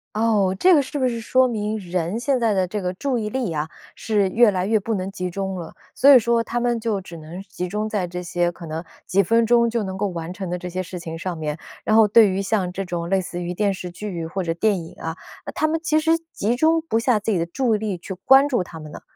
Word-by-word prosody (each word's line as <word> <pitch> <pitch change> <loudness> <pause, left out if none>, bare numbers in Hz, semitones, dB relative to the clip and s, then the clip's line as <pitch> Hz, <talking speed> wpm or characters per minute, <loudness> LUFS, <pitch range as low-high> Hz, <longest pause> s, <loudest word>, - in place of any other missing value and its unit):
哦， 210 -4 +2
这 370 -1 +6
个 290 - +5
是 285 +2 -5
不 260 - +2
是 235 -2 -3
说 255 +3 +3
明 215 -2 -2
人 180 +2 -2
现 265 +2 +1
在 230 -3 +2
的 190 -2 +1
这 205 +2 -4
个 180 0 -2
注 265 +4 -1
意 215 -2 -2
力 250 -3 -2
啊， 155 +1 -2 0.3
是 210 -3 +1
越 230 +2 +5
来 185 -1 -1
越 220 +2 +3
不 220 +2 -2
能 190 -1 -3
集 185 -2 -4
中 195 +1 -3
了， 170 -3 -7 0.2
所 280 +2 +7
以 260 - +9
说 235 0 +1
他 240 +1 -2
们 240 0 +1
就 220 -3 -1
只 180 -2 -10
能 165 +3 -8
集 180 -2 -5
中 210 +3 -2
在 205 -4 -1
这 180 +1 -6
些 175 0 0
可 170 0 -11
能 160 +1 -5 0.2
几 200 +2 +3
分 230 +5 +3
钟 235 0 +4
就 230 -1 -1
能 190 -1 -5
够 205 +1 0
完 170 -2 -5
成 190 -1 -5
的 180 - -2
这 180 0 -6
些 185 +1 -3
事 180 0 -7
情 165 -1 -6
上 175 0 -4
面， 150 -1 -3 0.3
然 215 - +3
后 220 -1 +6
对 215 0 +7
于 190 +1 -1
像 195 -3 -1
这 195 - -3
种 170 -2 -4
类 195 0 +2
似 175 -1 -6
于 175 0 -3
电 200 +2 +1
视 185 -1 -6
剧 175 -2 -5
或 190 +3 -3
者 165 -1 -1
电 190 0 +1
影 165 - -11
啊， 160 0 -4 0.3
那 - - -5
他 - - 0
们 320 +1 0
其 320 -2 +1
实 325 +1 +3 0.2
集 230 +4 0
中 320 +3 +3
不 230 -8 0
下 240 -1 +2
自 215 +1 -2
己 190 - +2
的 165 - 0
注 225 +6 0
意 - - +1
力 210 -3 -3
去 180 +3 -7
关 270 +2 +7
注 245 -8 +1
它 160 -2 -10
们 155 - -10
呢？ - - -9
200 Hz, 300 characters per minute, -22 LUFS, 180-230 Hz, 0.3 s, 以